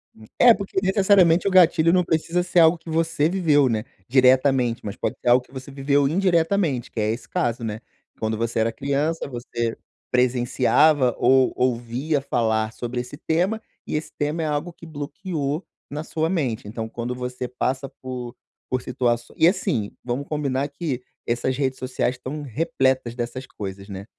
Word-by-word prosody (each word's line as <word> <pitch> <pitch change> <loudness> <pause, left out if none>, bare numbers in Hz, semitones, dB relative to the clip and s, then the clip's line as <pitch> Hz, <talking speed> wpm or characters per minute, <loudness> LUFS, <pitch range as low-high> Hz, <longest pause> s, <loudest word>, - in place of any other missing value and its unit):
Hum. 110 - -15
É, 245 -1 +8
porque, 195 -2 -2
necessariamente, 190 -3 +4
o - - +2
gatilho 170 -2 +5
não 180 -1 +4
precisa 165 +2 0
ser 175 0 +2
algo 165 +1 +6
que 165 - -12
você 160 -1 +1
viveu, 155 -7 +3
né, 110 -2 -1 0.2
diretamente, 130 -1 +3
mas 100 - -4
pode - - -2
ser - - -8
algo 125 +1 +5
que - - -25
você 135 +1 -9
viveu 140 +1 +2
indiretamente, 170 - +1
que - - -5
é 105 0 +1
esse 115 - -6
caso, 120 0 -1
né? 110 -1 -3 0.4
Quando 110 0 -1
você 115 0 -1
era 115 +1 +2
criança, 140 +6 -1
você 120 -2 -3 0.3
presenciava 125 +2 +3
ou 130 +1 +4
ouvia 125 +4 0
falar 110 -4 0
sobre 120 +1 -4
esse 125 +3 -9
tema, 180 +9 0 0.2
e - - -3
esse 150 - -3
tema 150 +2 -1
é - - -1
algo 150 +4 -2
que 165 - -14
bloqueou 155 0 -4 0.3
na 150 +2 -4
sua 160 0 -1
mente, 130 - -1
então 110 +1 -5
quando 120 +2 -4
você 125 0 -4
passa 130 +2 -2
por 125 -2 -6 0.4
por 130 0 0
situaç 120 -1 0
e 160 - +5
assim, 150 - 0
vamos 125 +3 -3
combinar 140 -2 -1
que 140 -3 -4 0.3
essas 120 +2 0
redes 130 -2 -1
sociais 130 0 -1
estão 130 +4 -6
repletas 130 -2 0
dessas 125 +2 -5
coisas, 100 -2 -7
né, 100 0 -7
135 Hz, 175 wpm, -23 LUFS, 120-160 Hz, 0.4 s, É